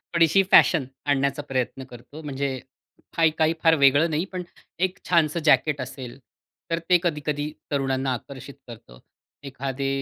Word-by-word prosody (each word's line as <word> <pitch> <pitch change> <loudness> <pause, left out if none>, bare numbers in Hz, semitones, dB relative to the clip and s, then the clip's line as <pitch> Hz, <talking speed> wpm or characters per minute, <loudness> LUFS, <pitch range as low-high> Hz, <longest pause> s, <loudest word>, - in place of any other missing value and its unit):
थोडीशी 170 +3 +4
फॅशन 155 -7 +5 0.2
आणण्याचा 140 0 0
प्रयत्न 130 0 -2
करतो, 125 +5 -12
म्हणजे 140 -2 -3 0.6
फाई 165 -1 +5
काही 160 0 +2
फार 165 -1 +5
वेगळं 145 +3 +4
नाही, 155 +3 -1
पण 185 -2 -6 0.4
एक 185 0 -1
छानसं 170 -2 +2
जॅकेट 150 -2 +3
असेल, 130 0 -8 0.5
तर 165 - +1
ते 180 - +6
कधी-कधी 150 -2 -2 0.2
तरुणांना 135 -1 0
आकर्षित 135 +2 -9
करतं. 105 - -13 0.4
एखादे 135 0 -4
140 Hz, 140 wpm, -24 LUFS, 135-160 Hz, 0.6 s, ते